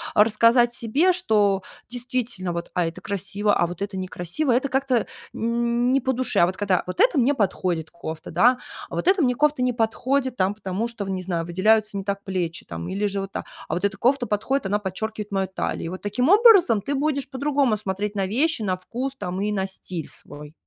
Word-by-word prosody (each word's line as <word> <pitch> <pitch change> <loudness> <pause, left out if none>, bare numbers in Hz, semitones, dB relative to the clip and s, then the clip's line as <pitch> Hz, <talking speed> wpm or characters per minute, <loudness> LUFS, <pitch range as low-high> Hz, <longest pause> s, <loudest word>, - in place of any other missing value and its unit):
рассказать 230 +3 +5
себе, 270 +11 +2
что: 210 - +2 0.3
"Действительно, 245 -6 -2
вот, 170 0 -5
а 175 -2 +1
это 165 - -6
красиво, 200 +1 -1
а 175 - +2
вот 175 +2 -8
это 200 -1 -3
некрасиво, 185 - -2
это 260 +3 +2
как-то 265 -3 +1 0.3
не 235 +3 +1
по 260 +2 0
душе". 255 +1 +1
А 170 - +7
вот 185 - -4
когда: 195 -3 +1
"Вот 185 - -6
эта 440 - +4
мне 265 +4 +3
подходит 180 -6 -1
кофта, 160 -2 -7
да, 250 +2 +4 0.3
а - - -6
вот - - -2
эта 380 -2 +4
мне 250 -3 +2
кофта 295 -2 +2
не 250 0 +2
подходит, 255 +3 0
там, 190 -1 +1
потому 205 +2 -3
что, 225 -4 -5
в, - - -6
не 185 -1 -2
знаю, 170 -3 -2
выделяются 215 +4 +2
не 195 - -3
так 200 0 -3
плечи, 180 -4 -3
там, 85 0 -6
или 200 +2 -1
же 200 -1 -1
вот 195 0 -6
так. - - -5 0.2
А - - -3
вот 180 - -2
эта 195 -1 -1
кофта 250 +2 +2
подходит, 260 +6 -1
она 205 +2 +1
подчеркивает 210 +2 -5
мою 195 -1 0
талию." 190 - -3
И - - -3
вот 185 +2 -7
таким 210 +6 0
образом, 395 - +6
ты 280 +7 -2
будешь 280 -1 -1
по-другому 275 -4 +1
смотреть 205 +1 -3
на 195 -1 0
вещи, 250 +6 +1
на 190 -3 0
вкус, 250 +9 -5
там, 185 -1 -4
и 210 +1 0
на 190 -2 0
стиль 180 -4 -5
свой. 150 +1 -8
210 Hz, 215 wpm, -24 LUFS, 190-255 Hz, 0.3 s, А